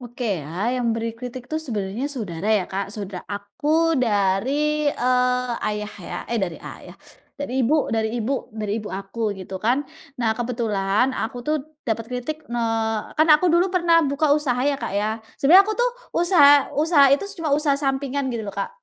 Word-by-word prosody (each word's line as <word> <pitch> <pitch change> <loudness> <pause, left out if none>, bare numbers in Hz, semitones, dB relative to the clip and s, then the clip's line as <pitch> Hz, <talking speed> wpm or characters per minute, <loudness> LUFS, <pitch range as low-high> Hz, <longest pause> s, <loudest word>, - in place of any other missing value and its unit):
Oke 245 0 -7 0.2
ya, - - -9 0.3
yang 235 -2 +1
beri 230 0 -2
kritik 250 +1 -7
tuh 315 0 -2
sebenarnya 215 -4 -3
saudara 205 - -4
ya, 185 - -2
Kak, 195 +1 -3
sauda 200 -3 -6
aku 290 +12 0
dari, 260 +9 +1
eee, 250 0 +1
ayah 210 0 -3 0.2
ya - - -5
eh 235 - -1
dari 175 -3 -6
ayah, - - -11 0.4
dari 285 -3 -4
ibu 290 +7 +3 0.2
dari 220 -1 0
ibu 235 +3 -1 0.3
dari 210 -1 -2
ibu 210 - -7
aku 195 +4 -7 0.2
gitu 190 0 -8
kan, 245 +4 +3 0.4
nah 225 -2 +2
kebetulan 225 -3 0
aku 225 +3 -3
tuh 305 +1 +2 0.3
dapat 225 0 -1
kritik 250 +5 -3
eee, 225 -2 0 0.2
kan 310 - +4
aku 305 +4 +2
dulu 345 +2 +4
pernah 345 -2 +3
buka 290 +3 +1
usaha 280 -5 0
ya, 280 - -1
Kak - - -4
ya, 210 - 0 0.3
sebenarnya 360 +8 +7
aku 435 - 0
tuh - - +3 0.3
usaha 340 -4 +6 0.3
usaha 305 -3 +5
itu 280 - +2 0.2
cuma 320 - -1
usaha 295 -2 +1
sampingan 275 0 -1
gitu 230 -2 -3
loh, 200 - -7
Kak, 200 - -2
245 Hz, 180 wpm, -23 LUFS, 210-290 Hz, 0.4 s, sebenarnya